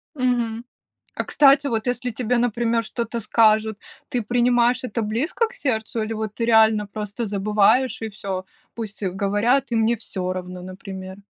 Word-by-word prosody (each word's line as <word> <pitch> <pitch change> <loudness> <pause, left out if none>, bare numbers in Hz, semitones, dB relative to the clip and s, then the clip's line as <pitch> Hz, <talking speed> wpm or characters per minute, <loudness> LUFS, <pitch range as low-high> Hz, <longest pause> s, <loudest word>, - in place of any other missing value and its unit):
Мгм. 240 -3 -1 0.5
А - - -2
кстати, 280 0 +5
вот 225 -3 -1
если 245 0 -1
тебе, 245 +1 -1
например, 235 -1 +1
что-то 235 +1 -3
скажут, 220 -1 +3 0.3
ты 245 - -1
принимаешь 245 +2 +2
это 230 -2 -3
близко 240 - 0
к - - -16
сердцу, 230 - -2
или 215 +1 -3
вот 215 -1 -4
ты 230 - -2
реально 220 -2 +4
просто 210 +2 -5
забываешь 210 +5 +2
и 225 - -3
всё, 195 -3 -5 0.3
пусть 215 -3 -7
говорят, 205 +7 +1
и - - +2
мне 225 +1 +3
всё 185 -4 -4
равно, 180 0 -6
например? 190 +1 -9
225 Hz, 160 wpm, -23 LUFS, 205-245 Hz, 0.5 s, кстати